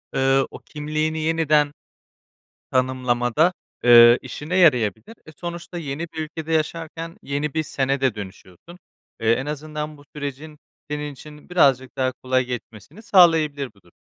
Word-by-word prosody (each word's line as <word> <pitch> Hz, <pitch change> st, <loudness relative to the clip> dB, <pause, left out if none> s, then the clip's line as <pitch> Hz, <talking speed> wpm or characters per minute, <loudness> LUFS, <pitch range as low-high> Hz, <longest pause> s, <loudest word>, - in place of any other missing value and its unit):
ııı, 135 Hz, 0 st, +3 dB
o -, -, -10 dB
kimliğini 155 Hz, +1 st, -3 dB
yeniden 155 Hz, -2 st, +2 dB, 1.0 s
tanımlamada, 130 Hz, +4 st, +1 dB, 0.3 s
ııı, 120 Hz, 0 st, +8 dB
işine 160 Hz, +5 st, -5 dB
yarayabilir. 125 Hz, -, +2 dB
E, 155 Hz, -, -12 dB
sonuçta 175 Hz, 0 st, -6 dB
yeni 150 Hz, +1 st, -4 dB
bir 160 Hz, -, -9 dB
ülkede 160 Hz, +1 st, -6 dB
yaşarken 165 Hz, +2 st, -3 dB
yeni 140 Hz, +1 st, -3 dB
bir 160 Hz, -, +1 dB
"sen"e 135 Hz, -2 st, -1 dB
de 130 Hz, -4 st, +1 dB
dönüşüyorsun. 100 Hz, -, -11 dB, 0.4 s
Eee, 110 Hz, 0 st, +2 dB
en 125 Hz, +4 st, -1 dB
azından 150 Hz, +1 st, -5 dB
bu 145 Hz, -, -17 dB
sürecin 150 Hz, +1 st, -6 dB, 0.3 s
senin 150 Hz, 0 st, -3 dB
için 150 Hz, +3 st, -14 dB
birazcık 135 Hz, -8 st, +2 dB
daha 130 Hz, -1 st, 0 dB
kolay 130 Hz, 0 st, 0 dB
geçmesini 120 Hz, -, -8 dB
sağlayabilir 160 Hz, -, +4 dB
bu 100 Hz, -, -25 dB
durum. 85 Hz, -, -24 dB
150 Hz, 140 wpm, -22 LUFS, 130-160 Hz, 1.0 s, ııı